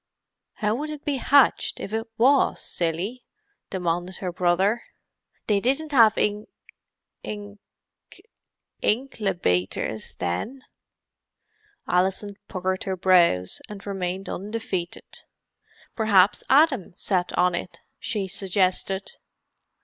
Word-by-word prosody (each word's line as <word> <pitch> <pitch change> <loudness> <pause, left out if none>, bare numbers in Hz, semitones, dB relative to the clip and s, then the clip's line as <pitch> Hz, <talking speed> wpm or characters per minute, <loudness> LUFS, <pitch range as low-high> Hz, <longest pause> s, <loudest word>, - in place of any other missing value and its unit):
"How 210 -1 0
would 295 +6 -3
it 300 -1 -8
be 285 -2 0
hatched 280 0 +3
if 205 - -6
it 225 +1 -2
was, 270 +4 +4
silly?" 180 +9 -3 0.5
demanded 180 0 -2
her 185 -2 -3
brother. 185 +6 +2 0.6
"They 205 -2 +2
didn't 275 +7 0
have 230 -5 +6
ink 210 +1 0 0.7
ink 205 -1 -7 1.2
inklebaters 180 - -1
then." 155 - -3 1.2
Alison 190 +3 0
puckered 185 -1 -2
her 190 -1 -2
brows, 175 - +3
and 205 -2 -9
remained 190 -1 -3
undefeated. 195 -3 -5 0.7
"P'raps 205 -4 +4
Adam 270 - +4
sat 180 -1 0
on 180 0 +3
it," 175 +1 -5 0.2
she 210 -4 -2
suggested. 190 0 -1
195 Hz, 100 wpm, -25 LUFS, 180-225 Hz, 1.2 s, have